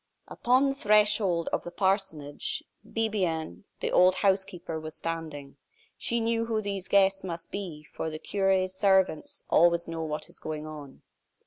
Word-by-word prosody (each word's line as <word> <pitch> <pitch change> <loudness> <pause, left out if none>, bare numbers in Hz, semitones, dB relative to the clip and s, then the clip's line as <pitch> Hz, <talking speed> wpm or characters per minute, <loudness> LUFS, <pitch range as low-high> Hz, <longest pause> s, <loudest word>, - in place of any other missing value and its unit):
Upon 255 +3 +2
the - - 0
threshold 210 -7 +3
of - - 0
the - - -6
parsonage, 190 -6 -1 0.2
Bibiaine, 195 -7 -2 0.2
the - - -1
old 185 +1 +5
housekeeper, 190 -4 0
was 155 0 -8
standing. 155 -4 -5 0.4
She 235 - 0
knew 230 0 0
who 225 -1 0
these 200 -3 -3
guests 195 -1 +3
must 170 -2 -6
be, 175 -7 -5
for 160 - -5
the 155 - -5
cure's 190 +2 +1
servants 190 -5 +1
always 170 0 +4
know 165 -1 -4
what 155 -1 -3
is - - -15
going 155 -1 -5
on. 150 -3 -10
185 Hz, 150 wpm, -28 LUFS, 160-200 Hz, 0.4 s, old